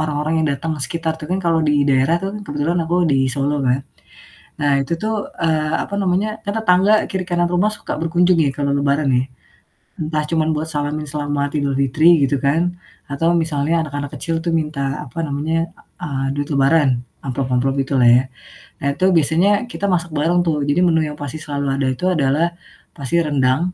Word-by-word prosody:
orang-orang 150 0 -1
yang - - +1
datang 160 +4 -3
sekitar 165 -1 -2
tuh 150 - -6
kan 190 - +1
kalau 165 -1 +2
di 150 - +3 0.2
daerah 135 +4 +3
tuh 195 - -3
kan, - - -5
kebetulan 150 +4 -1
aku 170 +2 -1
di 135 -3 +2
Solo 140 +1 -1
kan, 125 +1 +2 0.8
nah 145 -1 +3
itu 135 +5 -3
tuh, 215 -1 -2
eee, 155 -2 +1
apa 200 - -6
namanya, 195 +1 +1 0.2
kan 205 - -2
tetangga 190 0 +4 0.2
kiri 190 -1 -3
kanan 175 -1 0
rumah 180 +5 +1
suka 210 - -5
berkunjung 175 +2 +3
ya 140 - +1
kalau 140 0 -1
Lebaran 140 +1 +1
ya. 125 - +2 0.8
Entah 155 -1 -1
cuman 160 -2 +1
buat 155 - -2
salamin 150 +1 -2
selamat 145 0 -2
Idulfitri 140 +3 +3
gitu 140 0 +1
kan, 165 +6 0 0.3
atau 165 +5 +1
misalnya 160 0 0
anak-anak 145 -1 -5
kecil 165 +4 -2
tuh 170 - -1
minta, 150 -3 -2
apa 125 +6 -9
namanya, 160 +4 -1 0.3
e - - -10
eee, 135 -2 -2
duit 145 0 -2
lebaran 140 +1 +4 0.3
amplop 135 -1 -2
amplop 135 +2 +1
gitulah 130 -2 +2
ya. 120 +2 +6 0.6
Nah 140 - -1
itu 185 +6 0
biasanya 160 +5 +3 0.2
kita 200 - -3
masak 175 -2 0
bareng 165 +4 +2
tuh, 150 -3 0
jadi 145 - +2
menu 160 -1 +3
yang 150 - -8
pasti 145 +2 -5
selalu 145 -2 -3
ada 135 -1 0
itu 155 +8 -5
adalah 160 +1 +1 0.4
pasti 140 +3 -1
rendang, 145 +5 +1
150 Hz, 185 wpm, -19 LUFS, 140-170 Hz, 0.8 s, ya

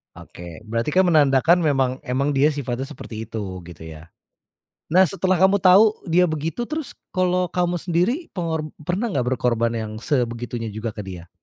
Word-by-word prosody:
Oke, 85 +1 -11
berarti 115 +8 -2
kan 190 - +6
menandakan 155 0 +4
memang 135 -5 +1
memang 135 +1 -1
dia 140 +1 +3
sifatnya 135 -3 -3
seperti 110 -7 -8
itu 100 -5 -5
gitu 85 -2 -11
ya? 80 0 -10 0.9
Nah, 185 0 +6
setelah 185 -2 0
kamu 190 +1 +5
tahu 200 +3 +5
dia 180 0 +3
begitu, 160 +9 -3
terus, 310 -3 -4 0.2
kalau 180 -1 +1
kamu 175 0 -1
sendiri 180 - +1 0.2
pengor 160 -3 -2 0.2
pernah 195 +8 -1
nggak 140 - -1
berkorban 115 -2 +1
yang 110 -2 -4
sebegitunya 120 -3 -2
juga 110 +1 -5
ke 110 - -8
dia? 90 -3 -8
145 Hz, 165 wpm, -22 LUFS, 115-180 Hz, 0.9 s, kan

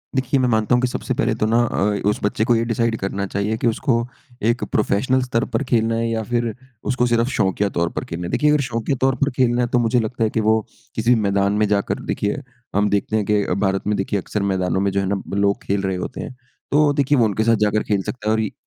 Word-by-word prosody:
देखिए 130 +1 +1
मैं 125 - +2
मानता 110 +2 +2
हूँ 125 - +2
कि 125 - +2
सबसे 130 - -3
पहले 120 - +1
तो - - +4
ना 115 +2 +2
अ, 105 -3 0
उस 105 - -1
बच्चे 105 +1 +1
को 120 - +3
ये 115 - +1
डिसाइड़ 115 0 0
करना 100 0 -3
चाहिए 100 +3 -1
कि 120 - 0
उसको 115 +1 0 0.4
एक 120 - -4
प्रोफ़ेशनल 120 +5 +1
स्तर 125 -2 0
पर - - +1
खेलना 115 -3 +1
है 115 0 0
या 110 -1 -1
फिर 120 -2 0 0.4
उसको 125 -1 +1
सिर्फ़ 120 +1 +2
शौकिया 100 -3 0
तौर 85 -2 -1
पर - - -2
खेलना 85 +2 -5
है। 85 - -4
देखिए 150 0 +2
अगर 150 -1 +3
शौकिया 120 +3 -1
तौर 135 0 +3
पर 140 +3 +1
खेलना 125 -1 +2
है 120 - +1
तो 125 - +4
मुझे 120 +1 +2
लगता 115 +1 -2
है 110 - +2
कि 110 - -1
वो 110 +1 +3 0.4
किसी 115 +2 +3
भी 115 - +2
मैदान 100 0 +1
में 105 0 +2
जाकर 100 -1 0
देखिए 105 +8 -2 0.3
हम 105 +1 +3
देखते 100 +2 0
हैं 105 -2 +1
कि 105 0 +2 0.2
भारत 95 +1 -1
में 105 - +1
देखिए 95 +1 -1
अक्सर 105 +3 -3
मैदानों 95 0 0
में 100 0 +1
जो 100 - 0
है 95 - 0
ना 100 -1 -1 0.2
लोग 100 0 +1
खेल 100 0 0
रहे 95 -1 -1
होते 110 - -5
हैं 130 - -7 0.4
तो 150 +2 +4
वो 145 - +3
देखिए 140 0 +2
वो 120 - +4
उनके 110 0 0
साथ 115 0 +4
जाकर 105 +1 +1
खेल 100 -2 0
सकता 105 -1 -4
है। - - +3
और 110 -2 -1
110 Hz, 265 wpm, -21 LUFS, 100-120 Hz, 0.4 s, तो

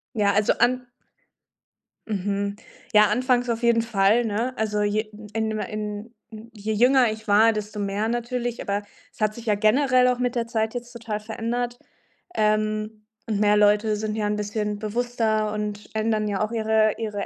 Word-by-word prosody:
Ja, 205 -2 +3
also 210 +1 +3
an 250 0 +2 1.2
Mhm, 200 0 -2 0.4
ja, 210 0 +7
anfangs 250 +2 +1
auf 230 0 -2
jeden 235 -1 +4
Fall, 225 +1 +2
ne? 225 +4 -1
Also 210 -1 0
je 210 +1 0 0.2
in 220 0 -1
ma 215 - -2
in 210 +1 -5 0.4
je 220 -1 -4
jünger 245 +2 +4
ich 220 0 -9
war, 215 +2 +5
desto 210 0 -5
mehr 200 +2 -1
natürlich, 240 0 -2
aber 200 0 -1 0.3
es - - -18
hat 215 0 +2
sich 235 - -10
ja 210 -2 +2
generell 250 +4 +3
auch 250 -1 +1
mit 245 -1 -1
der 235 -1 -1
Zeit 220 -1 -1
jetzt 240 0 -6
total 225 -3 -5
verändert. 240 +2 -3 0.6
Ähm, 215 0 0 0.2
und 215 -3 -1
mehr 210 0 +4
Leute 210 +1 +3
sind 215 0 -3
ja 215 -1 -1
'n 210 - 0
bisschen 210 0 -3
bewusster 220 -1 -1
und 210 -1 -4
ändern 215 -1 0
ja 200 -2 -2
auch 215 - -3
ihre 220 -1 +2
ihre 210 -3 -3
215 Hz, 175 wpm, -24 LUFS, 210-235 Hz, 1.2 s, ja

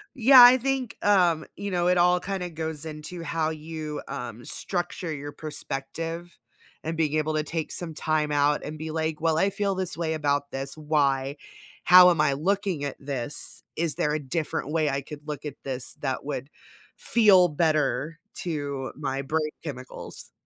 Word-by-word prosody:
Yeah, 255 0 +9
I 245 +1 +9
think, 265 -1 -2
um, 175 -6 +3
you 200 0 -5
know 175 -1 +1
it 180 0 +3
all 180 +1 +4
kinda 185 -1 -4
goes 160 -1 -5
into 160 +3 -7
how 160 0 -1
you, 155 -1 -5
um, 120 -4 -6
structure 175 -2 -3
your 145 0 -6
perspective 165 +3 -5 0.5
and 160 +1 -3
being 155 -2 0
able 155 0 0
to 155 0 0
take 160 +1 -3
some 170 -2 -3
time 155 -1 0
out 145 0 +2
and 155 +1 -6
be 155 +1 -5
like, 160 -1 -2
"Well, 160 -1 +2
I 195 - +3
feel 200 0 -1
this 185 -3 -3
way 165 -1 -1
about 145 -2 0
this, 135 +2 -5
why? 140 -2 +1 0.5
How 180 0 +9
am 165 -3 +2
I 145 -2 +3
looking 190 +1 -1
at 140 - -4
this? 140 -1 -5
Is 160 -3 -1
there 150 0 0
a 155 - 0
different 150 0 -3
way 155 -1 +1
I 140 0 -1
could 150 +2 -11
look 150 -1 -5
at 145 -2 -5
this 130 -2 -2
that 135 -2 -2
would 140 -1 -4 0.5
feel 200 -6 +5
better 155 0 0 0.2
to 145 -5 -3
my 135 -1 -3
brain 155 +2 -1
chemicals?" 130 -5 -8
155 Hz, 175 wpm, -26 LUFS, 145-175 Hz, 0.5 s, Yeah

